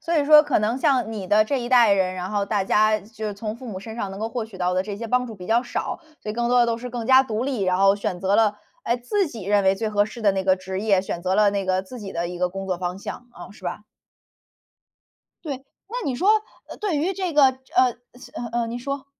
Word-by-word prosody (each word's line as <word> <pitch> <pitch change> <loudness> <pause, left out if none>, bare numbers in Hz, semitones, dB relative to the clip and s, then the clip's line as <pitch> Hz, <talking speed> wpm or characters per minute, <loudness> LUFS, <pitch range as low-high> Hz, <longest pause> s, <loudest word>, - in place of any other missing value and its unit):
所 335 0 -1
以 295 - +3
说 300 +1 +8
可 - - +1
能 220 +4 0
像 260 -6 +1
你 200 -4 -5
的 210 +3 +4
这 265 +4 -1
一 240 - -4
代 240 -4 +6
人， 190 -2 +1
然 185 0 -5
后 205 -1 0
大 205 -2 0
家 215 +2 +3
就 220 +1 -7
是 210 - -4
从 210 +1 -5
父 255 - -10
母 195 -4 -5
身 220 +2 -8
上 200 -4 -3
能 195 - -8
够 220 - -2
获 230 0 -3
取 215 -3 -12
到 180 0 0
的 185 - +1
这 200 0 -6
些 230 +2 -5
帮 250 +2 +1
助 225 - -8
比 180 -3 -10
较 230 +4 +3
少， - - -4 0.2
所 210 - -4
以 - - -3
更 235 +2 -1
多 245 0 +4
的 240 - +4
都 230 -1 -1
是 250 +1 -6
更 235 -1 -4
加 260 0 +7
独 225 -3 -3
立， 260 -7 -2
然 185 -1 +2
后 195 0 +5
选 200 -3 -3
择 195 +2 +2
了， 210 -2 +2 0.2
哎， 235 - 0
自 365 +12 0
己 230 -8 -8
认 205 +1 +3
为 190 0 +4
最 220 +2 -2
合 205 -1 +2
适 220 +2 -9
的 205 - +5
那 190 0 -1
个 190 0 +4
职 190 +1 -5
业， 200 -3 +3
选 175 - -4
择 185 +1 0
了 210 0 +4
那 200 -1 -2
个 185 0 0
自 245 +6 -10
己 200 -3 -7
的 170 +1 -2
一 180 0 -7
个 180 0 +1
工 195 +1 -6
作 185 -2 -2
方 180 +1 -3
向。 240 +4 -7
嗯， - - -10
是 - - -17
吧？ - - -4 1.6
对， 285 -5 -3 0.3
那 470 - -6
你 270 - -1
说， 365 +11 0 0.4
呃， - - -8
对 405 -7 -1
于 335 +7 0
这 370 -3 -3
个 295 -2 +6 0.3
呃， 255 -1 +4 0.3
次 255 -1 -14
呃， 240 0 -3
呃， 230 - -1
你 235 +1 -4
说。 275 +2 -4
215 Hz, 305 characters per minute, -23 LUFS, 195-245 Hz, 1.6 s, 说